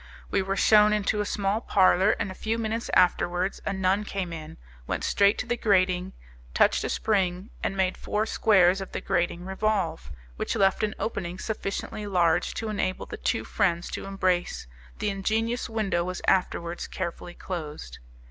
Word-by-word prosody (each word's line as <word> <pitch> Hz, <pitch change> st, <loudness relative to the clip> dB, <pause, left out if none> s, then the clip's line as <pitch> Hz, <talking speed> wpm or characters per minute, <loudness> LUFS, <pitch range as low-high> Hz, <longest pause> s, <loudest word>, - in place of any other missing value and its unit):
We -, -, +2 dB
were 195 Hz, +1 st, -2 dB
shewn 210 Hz, +1 st, +5 dB
into 210 Hz, 0 st, +1 dB
a 205 Hz, -, -2 dB
small 200 Hz, +2 st, 0 dB
parlour, 190 Hz, -1 st, +4 dB
and 210 Hz, -3 st, -2 dB
a -, -, -6 dB
few 220 Hz, +4 st, -2 dB
minutes 225 Hz, 0 st, -2 dB
afterwards 180 Hz, +1 st, +2 dB
a -, -, +1 dB
nun 190 Hz, +1 st, +1 dB
came 190 Hz, -4 st, -4 dB
in, 155 Hz, -1 st, -8 dB, 0.3 s
went -, -, -2 dB
straight 200 Hz, +1 st, +3 dB
to -, -, -3 dB
the 240 Hz, 0 st, 0 dB
grating, 185 Hz, -4 st, +1 dB, 0.4 s
touched -, -, +3 dB
a -, -, -2 dB
spring, 190 Hz, -2 st, 0 dB
and 195 Hz, -, -1 dB
made 185 Hz, -1 st, +1 dB
four 210 Hz, +1 st, -1 dB
squares 195 Hz, -4 st, +4 dB
of 190 Hz, -, -8 dB
the -, -, -2 dB
grating 175 Hz, -2 st, -1 dB
revolve, 190 Hz, -, -1 dB, 0.3 s
which -, -, -2 dB
left 195 Hz, -1 st, +3 dB
an 215 Hz, 0 st, -1 dB
opening 185 Hz, -5 st, -3 dB
sufficiently 210 Hz, 0 st, -4 dB
large 175 Hz, -3 st, +2 dB
to 225 Hz, -, -3 dB
enable 185 Hz, -3 st, -2 dB
the -, -, -7 dB
two -, -, -1 dB
friends 175 Hz, -3 st, 0 dB
to -, -, -5 dB
embrace. 185 Hz, -, -1 dB, 0.3 s
The 205 Hz, -, -1 dB
ingenious 225 Hz, +5 st, -1 dB
window 210 Hz, -6 st, 0 dB
was 185 Hz, +1 st, -5 dB
afterwards 175 Hz, -2 st, 0 dB
carefully 175 Hz, -1 st, -5 dB
closed. 150 Hz, -, -6 dB
195 Hz, 170 wpm, -26 LUFS, 180-210 Hz, 0.4 s, shewn